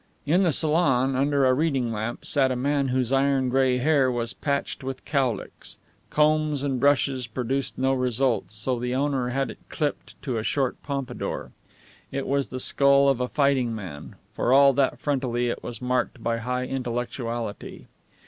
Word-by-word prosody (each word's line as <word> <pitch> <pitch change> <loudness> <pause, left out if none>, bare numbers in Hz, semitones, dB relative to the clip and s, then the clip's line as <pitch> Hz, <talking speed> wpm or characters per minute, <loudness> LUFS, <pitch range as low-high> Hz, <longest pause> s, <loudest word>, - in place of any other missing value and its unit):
In 170 +6 +3
the 175 -4 +3
salon, 140 -5 +2
under 140 +1 +2
a 130 - +4
reading 135 -4 0
lamp, 110 +2 -4
sat 135 -3 +2
a - - 0
man 140 +2 0
whose 130 -1 0
iron 135 -1 +2
gray 130 0 +2
hair 135 -1 +2
was 120 -1 -3
patched 140 -1 -3
with 130 0 -6
cowlicks. 130 -7 -2 0.3
Combs 150 -1 +2
and 135 -3 -1
brushes 135 -2 +2
produced 130 +3 -3
no 130 +1 +1
results, 125 -4 0
so 120 +4 -1
the 125 +1 -2
owner 135 -2 0
had 135 +2 -1
had - - -4
it - - -13
clipped 150 -3 -4
to 125 -5 -2
a - - -4
short 135 +1 -1
pompadour. 135 -4 -4 0.6
It 135 0 -3
was 140 0 0
the 130 - -6
skull 140 +1 +5
of 130 -2 +1
a 125 - 0
fighting 135 -5 +1
man, 90 -9 -8 0.2
for 120 - 0
all 140 +1 +6
that 135 0 +1
frontally 125 -4 -1
it - - -6
was 120 +1 -7
marked 125 0 -1
by 115 0 0
a - - -6
high 125 +2 -2
intellectuality. 120 -3 -4
130 Hz, 175 wpm, -25 LUFS, 125-140 Hz, 0.6 s, all